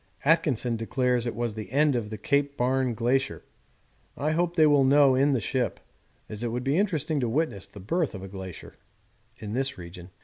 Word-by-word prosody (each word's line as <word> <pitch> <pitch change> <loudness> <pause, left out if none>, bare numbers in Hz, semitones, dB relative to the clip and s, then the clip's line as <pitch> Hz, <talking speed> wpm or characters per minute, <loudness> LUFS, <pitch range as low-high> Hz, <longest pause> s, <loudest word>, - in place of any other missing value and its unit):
Atkinson 140 -7 +2
declares 125 +1 0
it 120 - -3
was 120 -2 -2
the 110 -2 -7
end 145 0 +3
of 110 -3 -2
the 110 - -6
Cape 140 +5 0
Barne 130 -1 +1
Glacier. 125 +4 0 0.7
I 150 +2 0
hope 170 +2 0
they 160 -2 +5
will 145 -2 +5
know 140 0 +5
in 140 +2 +3
the 130 - +1
ship, 120 0 -2 0.5
as 105 0 -7
it - - 0
would 120 +2 -3
be 135 +2 +1
interesting 160 -6 0
to 120 -3 0
witness 125 -7 -1
the 100 - -13
birth 160 - -1
of 95 - -8
a - - -6
glacier 95 -2 -9 0.6
in 105 -1 -6
this 135 0 -1
region. 90 0 -10
130 Hz, 200 wpm, -27 LUFS, 110-145 Hz, 0.7 s, they